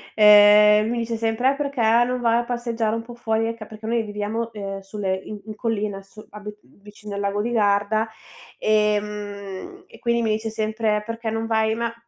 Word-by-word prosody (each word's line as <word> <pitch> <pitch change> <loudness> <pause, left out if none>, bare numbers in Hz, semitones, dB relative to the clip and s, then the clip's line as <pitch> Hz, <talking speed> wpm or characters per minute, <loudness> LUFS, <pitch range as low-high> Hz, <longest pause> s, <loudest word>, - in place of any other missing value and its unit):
ehm, 210 0 +7
mi 240 0 -1
dice 230 0 -2
sempre: 225 +4 +1
"Eh, - - -3
perché 280 -4 -2 0.2
non 250 0 -2
vai 230 0 +3
a - - -1
passeggiare 235 -2 -2
un 230 - -3
po' 240 +1 -11
fuori?" 225 -1 -1
Ecco 230 -1 -5
perché 215 +1 -10
noi 230 -1 +1
viviamo, 215 +2 -4
ehm, 195 -1 -5
sulle 195 -1 -3
in 210 -1 -8
in 215 -1 -8
collina, 210 -3 -2
sul 205 +2 -15
abit 210 0 -10
mhmm, 200 - -25
vicino 210 0 -10
al - - -3
lago 200 +1 -1
di 235 +3 -2
Garda, 210 0 +2 0.5
ehm, 210 - -2
e - - -17
quindi 235 0 +1
mi 220 -1 0
dice 220 +1 -2
sempre: 215 -1 -1
"Perché 230 0 -4
non 225 +1 -2
vai" 220 -1 +1
ma, 230 0 -2
220 Hz, 200 wpm, -23 LUFS, 210-230 Hz, 0.5 s, ehm